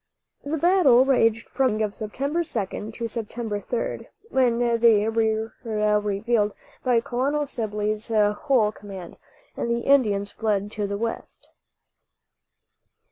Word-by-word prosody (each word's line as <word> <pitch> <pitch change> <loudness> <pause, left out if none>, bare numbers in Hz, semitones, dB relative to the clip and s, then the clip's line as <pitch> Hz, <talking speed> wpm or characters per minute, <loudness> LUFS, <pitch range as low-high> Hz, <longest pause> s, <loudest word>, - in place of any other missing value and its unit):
The 295 +3 -2
battle 300 -7 +5
raged 225 -4 +2
from 265 -1 +1
the 240 - 0
morning 215 0 0
of 205 - -6
September 275 +10 -3
2d 220 - -4
to 235 - -3
September 225 -1 -4
3d, 230 +4 -4 0.2
when 250 -3 +3
they 230 -3 +3
were 220 0 0
relieved 210 0 +1 0.3
by 245 -3 +3
Colonel 275 +5 -1
Sibley's 215 -4 -2
whole 215 +2 +2
command, 195 -5 -10 0.4
and - - -3
the 235 0 0
Indians 215 -7 +2
fled 205 -2 -1
to 210 -2 -3
the 200 0 -3
west. 230 +2 -5
225 Hz, 130 wpm, -24 LUFS, 210-245 Hz, 0.4 s, battle